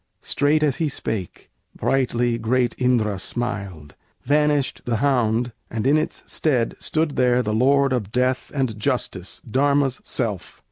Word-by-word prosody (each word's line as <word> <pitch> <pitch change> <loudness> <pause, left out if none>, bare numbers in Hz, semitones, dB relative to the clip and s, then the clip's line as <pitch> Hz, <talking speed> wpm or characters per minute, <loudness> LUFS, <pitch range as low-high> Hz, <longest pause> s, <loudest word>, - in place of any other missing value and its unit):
Straight 150 +2 +2
as 145 -4 +1
he 160 -2 0
spake, 110 -8 -5 0.2
brightly 120 -3 0
great 120 +1 +1
Indra 115 -6 +1
smiled; 100 -10 -4 0.3
Vanished 145 -1 +1
the 120 - 0
hound, 120 -2 +1 0.2
and 110 -1 -3
in 140 +3 +4
its 155 - -1
stead 125 -7 0
stood 155 -2 -1
there 125 -1 +3
The 105 - -2
Lord 135 +4 +3
of 105 -5 -2
Death 125 +1 0
and 125 -6 -1
Justice, 95 -5 -1
Dharma's 140 +2 +1
self! 105 -7 -2
125 Hz, 140 wpm, -22 LUFS, 110-140 Hz, 0.3 s, in